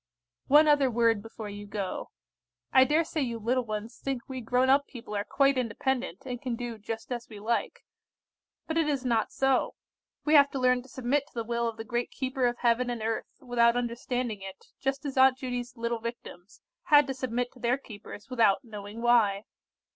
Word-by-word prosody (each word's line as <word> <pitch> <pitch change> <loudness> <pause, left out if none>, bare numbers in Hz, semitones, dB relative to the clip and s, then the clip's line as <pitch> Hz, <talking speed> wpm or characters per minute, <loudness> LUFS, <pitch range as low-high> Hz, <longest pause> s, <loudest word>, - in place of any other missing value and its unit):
"One 300 +3 +7
other 290 -3 +4
word 230 -2 +2
before 225 0 -8
you 205 0 -8
go. 200 -2 -4 0.6
I 260 0 +7
dare 305 +5 +3
say 320 -1 -3
you 235 -4 -2
little 240 +3 0
ones 215 +2 -5
think 265 -3 -4
we 260 -1 -5
grown 250 +3 +2
up 275 +2 +4
people 235 -4 -8
are 200 - 0
quite 275 +3 +2
independent, 250 -1 -2
and 250 -2 -5
can 250 -3 -2
do 235 -2 -6
just 225 +3 -6
as 240 -1 -4
we 215 -2 -9
like. 230 +3 -2 0.8
But 320 0 0
it 320 - +2
is 275 -3 -1
not 230 -3 +1
so. 270 -1 +1 0.5
We 305 - +2
have 285 -2 +7
to 270 - -2
learn 250 0 +3
to 260 - -17
submit 265 +3 -1
to - - -25
the 230 - -2
will 235 +1 -1
of 225 -1 -4
the 225 - -5
great 240 0 -2
Keeper 260 -1 -1
of 240 0 -2
Heaven 245 +1 +2
and 235 -2 -3
earth, 225 0 -2
without 240 -2 +3
understanding 240 -2 -2
it, 190 0 -9
just 270 +2 -2
as 270 -2 -4
Aunt 260 0 +6
Judy's 245 -1 -5
little 235 0 -2
Victims 225 -4 -8 0.2
had 290 -1 +6
to 270 - -3
submit 245 -1 -2
to 255 - -18
their 245 +2 +1
keepers 215 -4 -11
without 230 -3 +3
knowing 210 0 -8
why. 220 -4 +4
245 Hz, 200 wpm, -28 LUFS, 225-265 Hz, 0.8 s, One